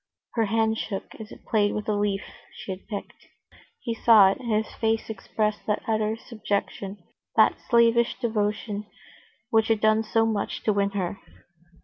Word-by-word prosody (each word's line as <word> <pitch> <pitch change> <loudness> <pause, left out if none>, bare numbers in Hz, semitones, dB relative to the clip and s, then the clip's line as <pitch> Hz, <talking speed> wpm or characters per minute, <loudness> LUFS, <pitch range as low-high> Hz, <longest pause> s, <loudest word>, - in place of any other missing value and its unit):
Her 225 -2 +2
hand 220 +1 +1
shook 195 -3 -5
as 220 -1 -9
it - - -13
played 205 -2 +2
with 210 - -4
a 215 - +1
leaf 205 -1 0 0.3
she - - -7
had 185 +1 -8
picked. 205 -3 -7 0.5
He 230 - -2
saw 220 -4 +6
it, - - -5
and 240 -3 -4
his 215 0 0
face 225 0 -1
expressed 210 +1 -2
that 210 - 0
utter 220 0 0
subjection, 205 -3 -4 0.4
that - - +4
slavish 235 0 +4
devotion, 210 -2 -2 0.6
which 220 0 +3
had 225 -2 +2
done 215 +1 +4
so 225 +1 +1
much 215 -3 -2
to 215 - +2
win 200 0 +1
her. 190 +1 -2
215 Hz, 165 wpm, -26 LUFS, 205-225 Hz, 0.6 s, saw